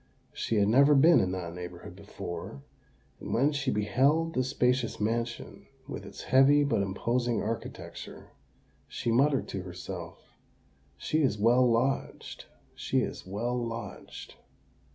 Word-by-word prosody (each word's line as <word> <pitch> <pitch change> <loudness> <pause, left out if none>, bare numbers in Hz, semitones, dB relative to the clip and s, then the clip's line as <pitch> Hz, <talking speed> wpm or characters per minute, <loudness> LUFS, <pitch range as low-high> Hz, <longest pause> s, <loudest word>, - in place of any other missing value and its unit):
She 115 - -2
had 100 -1 +3
never 140 +6 +5
been 160 +3 +6
in 95 - 0
that 85 -2 -5
neighbourhood 90 0 -9
before; 85 -7 -8 0.6
and - - -4
when 140 +5 +3
she 140 -2 -2
beheld 140 +10 +2
the 130 - +1
spacious 125 -2 0
mansion, 115 +2 -3 0.2
with 145 - -7
its - - -10
heavy 140 +2 +5
but 140 -8 +1
imposing 115 +4 -1
architecture, 115 +1 -7 0.6
she 120 - -3
muttered 135 +3 +2
to 95 - -4
herself, 90 -1 -9 0.6
"She 155 - 0
is 130 -8 +1
well 120 +4 +4
lodged—she 125 +4 -2
is - - -5
well 115 +6 -2
lodged!" 115 -1 -6
120 Hz, 130 wpm, -29 LUFS, 100-135 Hz, 0.6 s, been